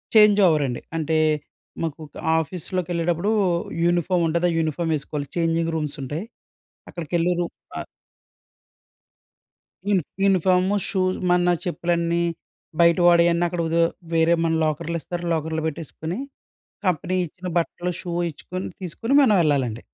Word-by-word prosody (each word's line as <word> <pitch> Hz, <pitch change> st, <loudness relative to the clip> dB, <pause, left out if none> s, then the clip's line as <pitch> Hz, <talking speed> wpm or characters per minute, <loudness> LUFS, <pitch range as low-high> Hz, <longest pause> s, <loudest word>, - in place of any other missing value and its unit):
Change 210 Hz, -1 st, +7 dB
over 155 Hz, -3 st, +3 dB
అండి. 120 Hz, -, -4 dB, 0.2 s
అంటే 160 Hz, 0 st, 0 dB, 0.7 s
మాకు 160 Hz, -1 st, -4 dB, 0.4 s
ఆఫీస్‌లోకెళ్ళేటప్పుడు 175 Hz, +2 st, -1 dB, 0.5 s
యూనిఫామ్ 175 Hz, 0 st, +2 dB
ఉంటది. 170 Hz, +2 st, +1 dB
ఆ -, -, -2 dB
యూనిఫార్మ్ 160 Hz, +1 st, 0 dB
వేసుకోవాలి. 145 Hz, 0 st, -4 dB
చేంజింగ్ 165 Hz, 0 st, +1 dB
రూమ్స్ 150 Hz, -1 st, -3 dB
ఉంటాయి. 150 Hz, +9 st, -4 dB, 0.7 s
అక్కడికెళ్లి 170 Hz, +1 st, -1 dB
రూ 175 Hz, -, 0 dB, 0.3 s
ఆహ్ -, -, -5 dB, 2.1 s
యూ -, -, +4 dB, 0.3 s
యూనిఫాము, 185 Hz, 0 st, +3 dB
షూ 190 Hz, -, -1 dB, 0.3 s
మన 180 Hz, 0 st, +4 dB
చెప్పులన్నీ 170 Hz, -1 st, 0 dB, 0.6 s
బయట 170 Hz, +1 st, +5 dB
వాడేయన్నీ 170 Hz, 0 st, +5 dB
అక్కడ 175 Hz, 0 st, -3 dB
ఒదె 165 Hz, +1 st, +2 dB, 0.3 s
వేరే 165 Hz, +1 st, +4 dB
మన 165 Hz, -, +1 dB
లాకర్‌లిస్తారు. 170 Hz, +3 st, -3 dB
లాకర్‌లో 160 Hz, 0 st, -1 dB
పెట్టేసుకొని 160 Hz, -, -5 dB, 0.7 s
కంపెనీ 185 Hz, +1 st, 0 dB
ఇచ్చిన 180 Hz, +4 st, -9 dB
బట్టలు, 175 Hz, +1 st, -1 dB
షూ 175 Hz, -, -6 dB, 0.2 s
ఇచ్చుకుని 185 Hz, +5 st, -6 dB
తీసుకుని 225 Hz, -, -1 dB
మనం 215 Hz, -5 st, +4 dB
వెళ్ళాలండి. 130 Hz, -6 st, 0 dB
170 Hz, 115 wpm, -23 LUFS, 160-180 Hz, 2.1 s, Change